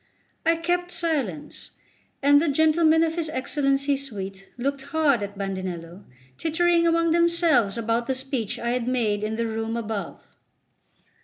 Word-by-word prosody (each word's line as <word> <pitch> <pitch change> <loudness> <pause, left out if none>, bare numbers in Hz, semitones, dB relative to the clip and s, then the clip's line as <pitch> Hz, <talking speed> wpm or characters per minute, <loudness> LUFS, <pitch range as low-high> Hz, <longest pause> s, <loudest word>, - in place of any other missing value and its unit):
I 330 - +5
kept 350 +2 -1
silence, 280 - -2 0.5
and 285 +1 +6
the 335 - 0
gentlemen 315 +2 +4
of 325 -1 0
his 320 -2 -1
Excellency's 275 0 0
suite 195 -2 -7
looked 275 +2 -2
hard 280 -4 +1
at 205 0 -6
Bandinello, 185 -2 -5 0.3
tittering 335 +1 +2
among 335 0 +2
themselves 335 - +3
about 230 +1 -1
the 265 - 0
speech 260 -5 -3
I 235 0 -2
had 245 -1 -1
made 220 -5 0
in 215 +1 -2
the 230 +1 -1
room 225 +1 -3
above. 220 -3 -4
270 Hz, 145 wpm, -24 LUFS, 220-320 Hz, 0.5 s, and